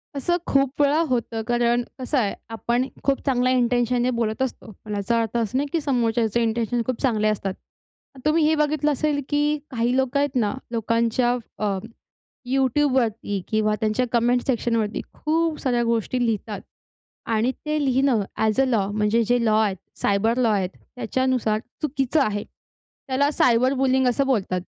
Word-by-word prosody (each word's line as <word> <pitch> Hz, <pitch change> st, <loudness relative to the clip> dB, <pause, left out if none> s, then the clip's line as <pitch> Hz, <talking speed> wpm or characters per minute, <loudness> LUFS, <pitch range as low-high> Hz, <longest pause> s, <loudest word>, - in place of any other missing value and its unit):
असं 345 Hz, +6 st, 0 dB
खूप 275 Hz, +1 st, +1 dB
वेळा 290 Hz, +3 st, +3 dB
होतं, 235 Hz, -2 st, -1 dB
कारण 240 Hz, 0 st, +2 dB, 0.2 s
कसं 260 Hz, +3 st, -1 dB
आहे 210 Hz, -6 st, +1 dB, 0.2 s
आपण 240 Hz, +3 st, -1 dB, 0.2 s
खूप 275 Hz, -1 st, +1 dB
चांगल्या 255 Hz, -2 st, +2 dB
इन्टेंशनने 245 Hz, 0 st, +2 dB
बोलत 220 Hz, +1 st, -1 dB
असतो. 250 Hz, -4 st, -3 dB
पण 210 Hz, -1 st, -4 dB
याचा 230 Hz, +4 st, 0 dB
अर्थ 225 Hz, +1 st, -2 dB
असा 230 Hz, +2 st, -1 dB
नाही 285 Hz, -, 0 dB
की 330 Hz, -, +1 dB
समोरच्याचे 235 Hz, -4 st, +1 dB
इन्टेंशन 230 Hz, +1 st, 0 dB
खूप 255 Hz, -2 st, -3 dB
चांगले 220 Hz, -6 st, +2 dB
असतात. 200 Hz, -2 st, -1 dB, 0.7 s
तुम्ही 305 Hz, +1 st, +3 dB
हे 315 Hz, -, +3 dB
बघितलं 300 Hz, 0 st, +1 dB
असेल 290 Hz, +1 st, 0 dB
की 295 Hz, +1 st, +1 dB
काही 240 Hz, +1 st, 0 dB
लोकं 265 Hz, +1 st, +1 dB
आहेत 285 Hz, -2 st, 0 dB
ना, 210 Hz, -4 st, +1 dB, 0.2 s
लोकांच्या 230 Hz, +2 st, +1 dB, 0.3 s
अ, 205 Hz, -2 st, 0 dB, 0.7 s
YouTubeवरती 255 Hz, -6 st, +1 dB
किंवा 215 Hz, -1 st, +1 dB
त्यांच्या 220 Hz, +4 st, +1 dB
कमेंट 240 Hz, +1 st, +2 dB
सेक्शनवरती 230 Hz, -4 st, 0 dB
खूप 320 Hz, 0 st, 0 dB
साऱ्या 245 Hz, -3 st, +1 dB
गोष्टी 235 Hz, +2 st, 0 dB
लिहितात 215 Hz, -2 st, -2 dB, 0.7 s
आणि 225 Hz, +4 st, +2 dB
ते 305 Hz, 0 st, 0 dB
लिहिणं 260 Hz, -3 st, +2 dB, 0.2 s
ॲज 220 Hz, +3 st, +1 dB
अ -, -, +3 dB
लॉ 220 Hz, -7 st, +1 dB
म्हणजे 215 Hz, +2 st, +2 dB
जे 240 Hz, +1 st, +1 dB
लॉ 215 Hz, 0 st, +3 dB
आहे, 205 Hz, -3 st, +1 dB, 0.3 s
सायबर 220 Hz, +4 st, +2 dB
लॉ 240 Hz, -3 st, +3 dB
आहेत, 190 Hz, -3 st, 0 dB, 0.3 s
त्याच्यानुसार 250 Hz, -2 st, 0 dB, 0.2 s
चुकीचं 285 Hz, 0 st, 0 dB
आहे. 205 Hz, -2 st, -2 dB, 0.6 s
त्याला 275 Hz, +2 st, +2 dB
सायबर 255 Hz, 0 st, +3 dB
बुलिंग 260 Hz, -1 st, +2 dB
असं 275 Hz, +3 st, +1 dB
बोलतात 195 Hz, -8 st, 0 dB
240 Hz, 160 wpm, -23 LUFS, 220-265 Hz, 0.7 s, वेळा